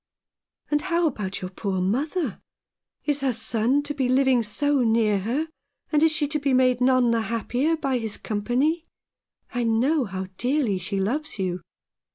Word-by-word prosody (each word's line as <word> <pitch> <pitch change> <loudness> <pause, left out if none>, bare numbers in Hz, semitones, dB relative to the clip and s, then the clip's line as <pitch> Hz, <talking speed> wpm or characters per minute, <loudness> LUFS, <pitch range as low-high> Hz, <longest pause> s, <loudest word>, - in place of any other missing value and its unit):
"And 295 0 +2
how 340 -1 +1
about 205 -10 -2
your 185 0 -5
poor 195 -1 -2
mother? 265 - -1 0.6
Is 290 -2 0
her 270 -1 +2
son 235 +5 +1
to 290 0 -3
be 265 -3 -1
living 260 -1 +4
so 285 +6 +1
near 225 -4 +3
her, 250 +11 -1 0.4
and 300 -1 +3
is 320 0 +5
she 300 -1 0
to 300 0 0
be 275 -2 0
made 255 -1 +3
none 255 -2 +4
the 230 -1 +2
happier 245 +8 0
by 270 -5 0
his 220 -3 -2
company? 255 +10 -1 0.7
I 245 -1 0
know 250 +6 +2
how 190 -2 -4
dearly 250 -7 +1
she 195 +2 -3
loves 290 +10 -2
you." 185 -2 -2
250 Hz, 170 wpm, -25 LUFS, 220-290 Hz, 0.7 s, is